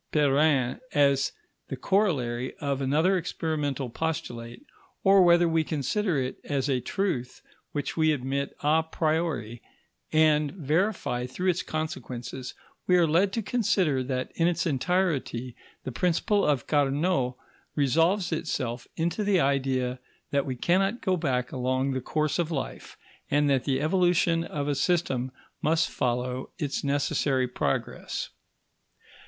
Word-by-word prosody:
Perrin 145 - +2
as 140 -1 +3 0.4
the - - -4
corollary 130 - 0
of 140 -2 -2
another 160 +8 +2
experimental 150 -6 -2
postulate, 125 - -4 0.4
or 195 0 +6
whether 175 -1 +5
we 165 -1 +2
consider 160 - -1
it 130 -1 -2
as 140 -2 -1
a 135 -3 +1
truth 130 - -2 0.3
which 145 - -3
we 155 -1 +3
admit 140 0 -2
a 155 +2 +3
priori 155 -8 -1 0.5
and 155 -2 +3
verify 155 - 0
through 180 +8 0
its 175 - -3
consequences, 130 -5 -5 0.3
we 180 - +5
are 175 - +5
led 175 +5 +3
to 225 - -1
consider 190 - +1
that 130 0 -3
in 165 - +2
its 170 0 0
entirety 145 -6 0 0.3
the 130 - -4
principle 180 - +1
of 140 -5 +1
Carnot 145 -2 +1 0.4
resolves 165 +8 +2
itself 130 -7 -3
into 170 +6 -1
the 200 -2 +3
idea 130 -3 0 0.3
that 140 0 +1
we 130 - -2
cannot 195 - +1
go 185 -3 +2
back 130 -7 -1
along 130 +1 0
the 130 -1 -2
course 155 +4 -1
of 170 -2 0
life, 150 -5 -5 0.3
and 145 +1 +3
that 130 -2 +1
the 135 -2 +1
evolution 170 +1 +2
of 145 -1 -3
a 145 - +1
system 135 -4 0 0.3
must 165 +1 +2
follow 125 +1 -2
its 145 -2 -2
necessary 140 -2 +1
progress. 125 - -3
145 Hz, 135 wpm, -27 LUFS, 130-170 Hz, 0.5 s, or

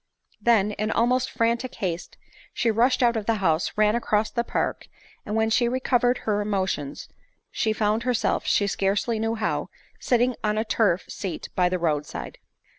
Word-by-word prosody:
Then, 215 -3 +3
in 215 +1 -2
almost 245 +3 +2
frantic 235 +2 -1
haste, 175 -5 -4 0.4
she 235 - +2
rushed 245 +4 +2
out 235 -1 +3
of 215 -2 -3
the 230 - +3
house, 175 -4 +1
ran 210 0 +3
across 220 -2 0
the 235 - 0
park, - - -2 0.4
and 210 - -2
when 220 0 +1
she 235 +1 +3
recov 255 0 +1
ered 245 0 +2
her 210 -1 +1
emotion 190 -9 -2 0.6
she 220 - 0
found 215 +1 +1
herself, 245 -1 0
she 205 - +3
scarcely 200 +3 0
knew 225 +1 0
how, 220 -1 -2 0.3
sitting 245 0 +2
on 210 0 0
a 220 - 0
turf 200 -6 +1
seat 190 -4 -5
by 180 -1 +3
the 185 - 0
road 150 -4 0
side. - - -7
215 Hz, 180 wpm, -25 LUFS, 200-235 Hz, 0.6 s, Then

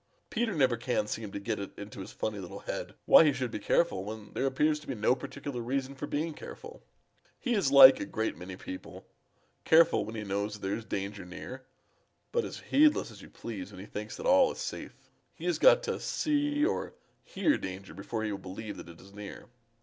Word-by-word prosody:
Peter 225 -4 0
never 130 -5 +3
can 120 -2 0
seem 105 -1 -5
to 100 - -4
get 105 +1 -2
it 100 - -7
into 105 0 -8
his 95 - -7
funny 105 -2 -3
little 90 -2 -8
head - - -5
why - - +9
he 150 - +5
should 130 -3 -3
be - - -4
careful 170 - +1
when 105 +1 -8
there 135 - 0
appears 150 +3 +2
to 150 - -15
be 135 - -3
no 110 +3 +3
particular 140 -1 -5
reason 135 +3 -2
for 140 +2 -6
being 155 +2 -2
careful. 465 - -10 0.6
He 245 - -1
is 195 -11 +2
like 135 -1 +10
a - - -2
great 110 0 -2
many 95 +1 -8
people 95 0 -9 0.6
careful 160 -9 +5
when 110 +2 -7
he 110 - -4
knows 100 +1 -2
that 105 - -13
there 100 - 0
is 115 - -7
danger 100 0 -4
near, 125 +9 -9 0.6
but 470 -1 +1
as - - -7
heedless 300 - +3
as 105 -3 -13
you - - -12
please 100 -5 -7
when 95 - -11
he 95 - -8
thinks 105 0 -6
that - - -7
all 275 -2 +5
is - - -9
safe. - - -6 0.4
He - - -8
has - - +1
got - - +7
to - - -2
see 295 0 +1
or - - -2 0.3
hear 320 -12 +1
danger 95 -2 -7
before 105 +5 -4
he 110 - -1
will 100 - -4
believe 100 +3 -7
that - - -10
it 85 - -13
is 100 +1 -15
near. 105 +2 -9
115 Hz, 220 wpm, -30 LUFS, 100-150 Hz, 0.6 s, like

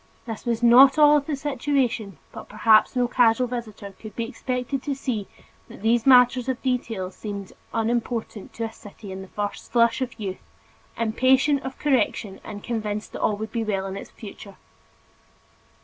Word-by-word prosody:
This 225 -3 -7
was 235 0 -1
not 265 +4 +7
all 295 -1 +7
of 285 - -3
the 305 - -1
situation 265 - -1
but - - -10
perhaps 215 +3 +4
no 245 -1 +2
casual 245 0 +3
visitor 230 -5 -6
could 215 +2 -12
be 230 - -2
expected 255 +2 -3
to 280 0 -3
see 235 -7 -3 0.4
that - - -13
these 230 +2 +2
matters 250 0 +5
of 255 - -1
detail 230 -7 -2
seemed 200 -1 -7 0.2
unimportant 230 -2 -2
to 230 - -5
a 225 - -3
city 205 -2 -12
in 190 0 -6
the 190 - -10
first 205 +1 -5
flush 235 +1 +3
of 255 -3 -4
youth, 195 -3 -5 0.6
impatient 260 +5 +2
of 265 0 -7
correction 245 -8 0
and 205 -1 -8
convinced 215 -3 -3
that - - -6
all 210 - +1
would 220 +1 -6
be 230 -2 -1
well 195 -3 -2
with 195 - -5
its - - -12
future. 200 -2 -11
230 Hz, 175 wpm, -24 LUFS, 210-255 Hz, 0.6 s, not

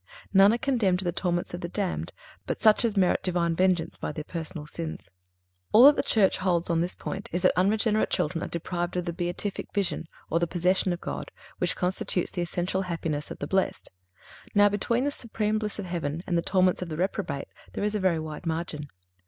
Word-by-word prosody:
None 195 +1 +7
are 235 - +2
condemned 235 -9 +2
to 190 - -5
the 175 - +1
torments 175 0 -1
of 175 - -5
the 170 - -4
damned 195 0 -2 0.4
but - - -2
such 215 +1 +5
as 220 -3 0
merit 185 -2 +3
Divine 170 -2 0
vengeance 180 -2 +1
by - - -3
their 150 0 -5
personal 160 -1 -5
sins. 160 +1 -6 0.6
All 230 - +9
that 290 +1 +9
the - - +2
Church 200 -4 +3
holds 175 -2 +1
on 165 -1 +2
this 175 +1 -1
point 195 - -6
is 175 +1 -2
that - - +6
unregenerate 215 +3 +2
children 165 +1 -1
are - - -3
deprived 175 +1 -3
of 180 - -1
the 170 - -2
beatific 175 +3 -3
vision, 195 -4 -1 0.2
or 165 - +1
the 170 - +1
possession 180 +2 +1
of 175 - -3
God, - - -5 0.3
which - - +1
constitutes 180 0 -1
the 175 - -3
essential 175 +2 -1
happiness 165 -5 -3
of - - -7
the - - -4
blessed. 190 0 -1 0.6
Now, 205 0 +7
between 230 +4 0
the 290 - +1
supreme 215 -4 -1
bliss 215 -1 -3
of 200 - -4
heaven 170 -2 -3
and 175 - -1
the 170 - +3
torments 185 0 +2
of 180 - -4
the 155 - -4
reprobate, 180 -5 -2 0.2
there - - -3
is 210 0 0
a 210 - 0
very 185 -3 +2
wide 155 +2 -6
margin. 160 -2 -3
180 Hz, 215 wpm, -27 LUFS, 170-200 Hz, 0.6 s, All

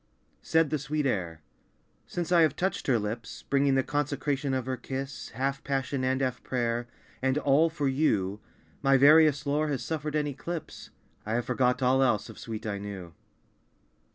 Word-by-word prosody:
Said 160 -2 +2
the 155 - 0
sweet 150 0 -2
air 85 - -2 0.6
"Since 175 0 -4
I 175 -2 +6
have 160 - +3
touched 190 +2 -2
her 130 -4 +4
lips, 110 +2 -5
Bringing 140 -1 +2
the 135 - +3
consecration 145 -1 -1
of 130 -2 -1
her 130 0 -2
kiss, 135 +2 -6
Half 135 +1 -1
passion 135 -1 -1
and 130 +1 +1
half 130 -2 -1
prayer, 120 -1 -1 0.3
And 130 +2 +1
all 150 +3 +4
for 150 -3 -2
you, 105 -9 +1 0.4
My 135 0 +5
various 150 +1 +6
lore 150 +2 +1
has 140 -4 -2
suffered 155 -1 -3
an 150 -1 +1
eclipse. 150 +4 -6 0.3
I 110 +2 -2
have 120 - -1
forgot 125 0 +1
all 130 +1 +4
else 115 -5 +2
of - - -11
sweet 110 -1 -6
I 100 -2 -2
knew." 95 -4 -7
135 Hz, 175 wpm, -28 LUFS, 120-150 Hz, 0.6 s, I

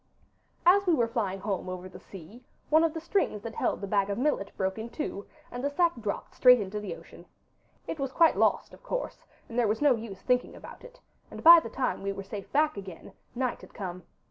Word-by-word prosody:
As 385 +2 +5
we 345 - +5
were 235 -5 +1
flying 200 -5 -2
home 195 -3 -3
over 185 0 -6
the 185 - -12
sea 195 +7 -13 0.3
one 315 +1 +6
of 330 - +2
the - - -2
strings 325 - -1
that 230 - -6
held - - -1
the 200 - -4
bag 200 0 +1
of 200 - -2
millet 255 -6 0
broke 190 +2 -2
in 225 +2 -6
two, 230 -7 -5 0.2
and 245 +1 -6
the 285 - +1
sack 340 +3 +2
dropped 210 -3 -4
straight 250 -1 +6
into 205 0 -4
the 195 -5 -5
ocean. - - -15 0.6
It 320 - -5
was 270 -1 -2
quite 330 +2 +4
lost, - - +1
of - - -15
course, - - -5 0.2
and 235 +1 -3
there 235 - +3
was 215 +1 0
no 290 -2 +5
use 220 -4 -7
thinking 250 -1 0
about - - -12
it, - - -14 0.3
and - - -10
by 335 +1 +11
the - - -7
time 260 - -2
we 200 0 -2
were 195 - -7
safe 200 0 -8
back 300 -3 +2
again 190 -4 -9 0.2
night 255 0 -2
had - - -15
come. 180 -4 -6
230 Hz, 230 wpm, -28 LUFS, 200-300 Hz, 0.6 s, by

